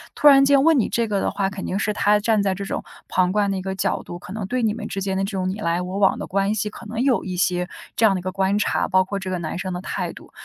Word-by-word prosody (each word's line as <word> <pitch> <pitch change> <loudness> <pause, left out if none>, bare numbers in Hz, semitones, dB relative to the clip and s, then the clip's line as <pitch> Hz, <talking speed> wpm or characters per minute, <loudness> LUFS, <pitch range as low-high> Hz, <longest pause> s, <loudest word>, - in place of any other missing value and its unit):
突 295 - +4
然 275 -1 +8
间 275 -1 +5
问 325 -1 +5
你 225 - +1
这 235 -1 0
个 205 -2 0
的 - - 0
话， 195 -1 -1
肯 195 0 -6
定 - - -3
会 - - 0
是 215 - 0
他 210 0 +3
站 215 0 +2
在 195 -1 +1
这 200 - -5
种 195 - -4 0.3
旁 180 -1 +2
观 205 0 +1
的 195 - -1
一 - - -3
个 190 +1 -3
角 190 - -1
度， 175 - -8
可 185 - -11
能 215 -2 -4
对 250 +4 -1
你 215 -2 +2
们 215 -1 -6
之 195 - -4
间 190 0 -1
的 195 - 0
这 195 - -3
种 185 -2 -1
你 195 +3 -4
来 170 -3 0
我 180 +2 -4
往 200 -1 +3
的 - - -5
关 195 +2 +1
系 210 0 -1
可 230 - -12
能 225 +2 -3
有 260 -2 +2
一 185 -1 -4
些 180 0 0 0.3
这 225 - +3
样 210 - +5
的 190 - -1
一 - - -7
个 185 +1 -3
观 195 +2 +1
察， - - 0
包 185 -1 +3
括 200 +2 -4
这 190 -1 -5
个 180 - -2
男 160 -1 -4
生 185 0 -4
的 180 - -4
态 - - -3
度。 - - -14
195 Hz, 360 characters per minute, -22 LUFS, 185-215 Hz, 0.3 s, 然